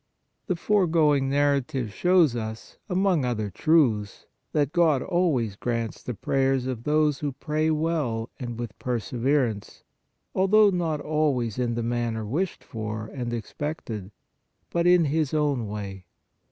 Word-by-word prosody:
The 185 - 0
foregoing 160 -8 +2
narrative 135 -5 0
shows 175 - +4
us, 110 -1 -6
among 185 -4 +2
other 110 -5 -2
truths, 115 - +2 0.3
that 145 -1 +1
God 160 -7 +3
always 155 - +1
grants 115 0 -3
the 125 - -5
prayers 135 +3 +1
of 125 -3 -4
those 150 -1 +2
who 145 -2 -2
pray 155 +3 -1
well 150 -8 -1
and 120 -3 -5
with 120 -3 -6
perseverance, 125 -1 -1 0.5
although 200 +2 +5
not 165 -5 -1
always 140 -8 0
in 120 -2 0
the 120 - -2
manner 115 -2 -1
wished 170 - -2
for 110 -1 -5
and 125 -3 -4
expected, 115 - -5 0.6
but 170 0 +1
in 175 -2 +5
His 155 0 0
own 145 -7 +1
way. 100 -3 -6
135 Hz, 135 wpm, -26 LUFS, 115-155 Hz, 0.6 s, although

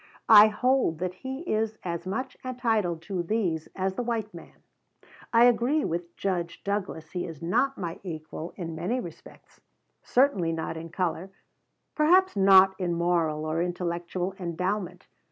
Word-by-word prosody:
I 215 -1 +10
hold 250 -5 +1
that 180 +2 -3
he 265 - -6
is 220 -8 -1
as 170 0 -4
much 255 +7 -3
entitled 225 -10 -1
to 185 +1 -3
these 170 -4 -1
as 190 0 -1
the 220 - -3
white 230 -3 -3
man. 170 - -13 0.7
I 230 0 +6
agree 245 +5 +3
with 170 +1 -4
Judge 175 -3 -3
Douglas 195 -6 -3
he 180 -1 -3
is 165 -2 -9
not 270 +11 +1
my 170 -3 -5
equal 160 -2 -7
in 165 -4 -5
many 185 +10 -2
respects, 170 -9 -12 0.4
certainly 205 -11 +2
not 160 0 -4
in 165 +1 -7
color, 175 +1 -2 0.6
perhaps 360 - +4
not 190 -1 +7
in 175 -2 -1
moral 165 -3 0
or 155 +2 -1
intellectual 175 +1 -3
endowment. 180 +1 -3
185 Hz, 150 wpm, -27 LUFS, 170-220 Hz, 0.7 s, I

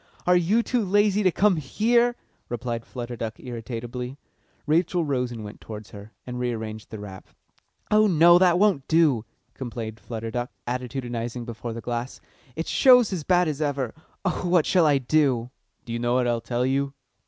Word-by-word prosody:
"Are 180 - +5
you 190 +7 +3
too 245 -2 0
lazy 205 +1 +3
to 185 -3 +3
come 195 0 +3
here?" 235 - +2 0.3
replied 120 -1 -4
Flutter 120 -1 -6
Duck 110 -1 -5
irritably. 120 +2 -6 0.5
Rachel 170 +2 +1
rose 125 -4 -1
and 115 -2 -7
went 105 0 -10
towards 110 -1 -9
her, 105 0 -11
and 125 -1 -5
rearranged 110 -3 -4
the 110 - -7
wrap. 100 -2 -9 0.6
"Oh 215 0 +5
no, 175 -1 +6
that 180 -2 +4
won't 190 -9 +2
do," 155 -9 +3 0.3
complained 115 -3 -6
Flutter 115 -1 -6
Duck, 120 +1 -3 0.2
attitudinising 120 -1 -4
before 115 0 -6
the 115 - -6
glass. 120 +2 -4 0.4
"It 165 - -3
shows 250 -6 +5
as 170 -5 -3
bad 180 +1 +3
as 155 -1 -3
ever. 140 -5 -1 0.3
Oh, 180 -1 -1
what 175 -3 +4
shall 175 -4 +4
I 145 -2 +4
do?" 130 -3 +1 0.3
"Do 115 - -5
you 120 - -2
know 120 +1 +1
what 125 -1 +2
I'll 120 -1 0
tell 120 +1 -1
you?" 135 +1 0
130 Hz, 175 wpm, -25 LUFS, 120-175 Hz, 0.6 s, no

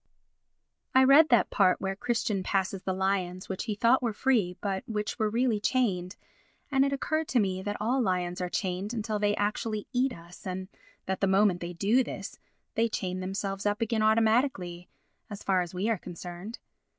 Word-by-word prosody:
I 260 - +7
read 285 +4 +7
that 240 -3 +4
part 185 -3 +3
where 195 0 -2
Christian 220 -2 -1
passes 190 0 -1
the 190 - -2
lions 185 -1 -1
which 190 +3 -4
he 215 -3 -2
thought 235 +5 +4
were 235 -3 -1
free 210 -7 +1
but 195 -2 -2
which 210 +2 -3
were 215 -1 +2
really 230 -1 +1
chained 200 -6 0 0.6
and 270 -1 +4
it 275 - +1
occurred 310 +3 -1
to 250 - +2
me 190 -3 0
that 205 +1 -3
all 245 +5 +1
lions 180 -4 -1
are 180 - -2
chained 190 +4 -2
until 215 -1 -2
they 205 0 +2
actually 210 +1 -2
eat 255 +2 +2
us 170 -1 -11
and 185 +1 -4 0.4
that, 190 0 -3
the 195 - +3
moment 190 -1 +3
they 175 0 -5
do 210 +9 +3
this, - - -7 0.3
they 230 +1 +1
chain 185 -3 -3
themselves 195 +1 -3
up 205 +1 0
again 225 -1 0
automatically, 220 -5 +2 0.4
as 205 -2 -8
far 190 -2 +2
as 175 -1 -4
we 185 +3 -2
are 225 -4 +1
concerned. 180 +5 -8
205 Hz, 185 wpm, -28 LUFS, 185-230 Hz, 0.6 s, I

